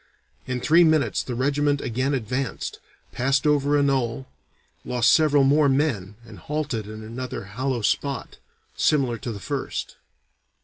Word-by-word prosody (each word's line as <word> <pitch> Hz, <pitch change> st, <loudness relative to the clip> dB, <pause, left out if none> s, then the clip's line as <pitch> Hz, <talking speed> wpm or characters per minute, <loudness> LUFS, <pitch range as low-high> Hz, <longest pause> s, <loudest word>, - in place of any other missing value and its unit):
In 125 Hz, -1 st, -2 dB
three 165 Hz, +6 st, +5 dB
minutes 155 Hz, -3 st, +2 dB
the 125 Hz, -, -5 dB
regiment 145 Hz, +3 st, +1 dB
again 130 Hz, +4 st, -1 dB
advanced, 125 Hz, +2 st, -3 dB, 0.3 s
passed 135 Hz, +3 st, 0 dB
over 145 Hz, -1 st, +3 dB
a 145 Hz, -, +3 dB
knoll, 130 Hz, -3 st, 0 dB, 0.6 s
lost 120 Hz, -1 st, +3 dB
several 150 Hz, -3 st, +4 dB
more 145 Hz, +1 st, +4 dB
men, 130 Hz, -9 st, 0 dB
and -, -, -12 dB
halted 145 Hz, -8 st, -3 dB
in 110 Hz, 0 st, -8 dB
another 120 Hz, +2 st, -6 dB
hollow 120 Hz, +4 st, -3 dB
spot, 140 Hz, +4 st, -1 dB, 0.4 s
similar 130 Hz, -6 st, +1 dB
to 120 Hz, -, -5 dB
the 105 Hz, -, -7 dB
first. -, -, -4 dB
135 Hz, 140 wpm, -24 LUFS, 120-145 Hz, 0.6 s, three